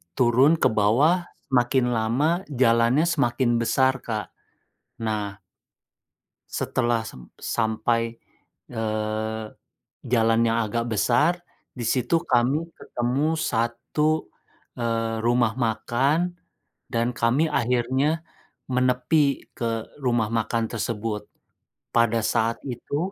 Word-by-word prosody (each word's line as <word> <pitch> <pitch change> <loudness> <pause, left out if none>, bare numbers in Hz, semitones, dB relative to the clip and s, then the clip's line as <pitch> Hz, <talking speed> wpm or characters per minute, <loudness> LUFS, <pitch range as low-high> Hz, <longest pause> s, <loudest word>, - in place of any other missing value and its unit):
turun 130 +6 +4
ke 165 - +2
bawah 140 - +3 0.2
semakin 125 0 +3
lama 115 +6 +1 0.2
jalannya 120 +1 +3
semakin 125 -7 +1
besar, 130 +3 +2
Kak. 110 -3 -4 0.7
Nah 105 -3 -3 1.1
Setelah 120 -2 0
sem 65 - -10
sampai, 115 +1 -1 0.6
eee, 110 -1 -2 0.6
jalan 115 -1 +2
yang 115 0 +2
agak 115 +1 -1
besar. 125 - +2 0.3
Di 120 -3 -4
situ 125 +7 +2
kami 130 +7 +2
ketemu 140 +7 -1
1, 130 +7 0 0.5
eee, 115 -1 -1
rumah 120 -1 +2
makan 135 +8 0 0.5
dan 115 +1 0
kami 125 +6 +1
akhirnya 130 +5 +1 0.5
menepi 130 +3 +1
ke 115 -2 -2
rumah 120 -5 0
makan 115 0 -1
tersebut. 110 -2 -3 0.7
Pada 115 -1 +2
saat 115 +1 0
itu 140 +7 -3
120 Hz, 95 wpm, -24 LUFS, 115-130 Hz, 1.1 s, turun